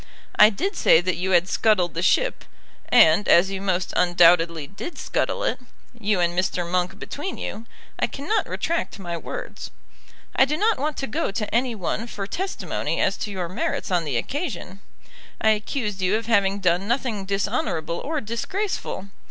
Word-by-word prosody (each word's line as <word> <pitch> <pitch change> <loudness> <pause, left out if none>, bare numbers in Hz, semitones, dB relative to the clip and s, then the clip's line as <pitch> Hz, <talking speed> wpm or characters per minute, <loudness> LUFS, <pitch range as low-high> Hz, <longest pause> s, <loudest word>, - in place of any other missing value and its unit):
I 210 - +8
did 380 - -2
say 160 - +5
that 180 +1 -1
you 185 +2 -2
had 180 -1 +4
scuttled 190 -5 +2
the 170 - -2
ship; - - +2 0.5
and 160 +6 +6
as 190 +3 +5
you 195 -1 -4
most 185 -2 -1
undoubtedly 170 -3 +4
did 200 - -8
scuttle - - -1
it, - - 0 0.3
you 210 -4 0
and 175 0 +1
Mr. 180 -1 0
Monk 180 +2 -1
between 295 - -5
you, 225 +2 -6 0.3
I - - +2
cannot 295 +11 -2
retract 335 -8 -2
my 175 -3 -5
words. - - -7 0.7
I 265 - +6
do 300 +3 -1
not 435 +5 +2
want 300 +1 -2
to 270 - -2
go 220 - -2
to 205 +1 -4
any 240 0 +1
one 215 +4 -3
for 200 -4 -5
testimony 380 - -3
as - - +2
to 215 - -4
your 185 -3 -3
merits 185 +2 -3
on 175 -2 +2
the 140 -6 -1
occasion. 205 - -4 0.6
I 220 - +3
accused 210 -2 -2
you 185 +3 +2
of 225 +1 -2
having 200 -3 +2
done 180 +1 +1
nothing 235 -5 -1
dishonourable 195 - -1
or 305 0 -3
disgraceful. 235 - -3
200 Hz, 175 wpm, -24 LUFS, 180-245 Hz, 0.7 s, I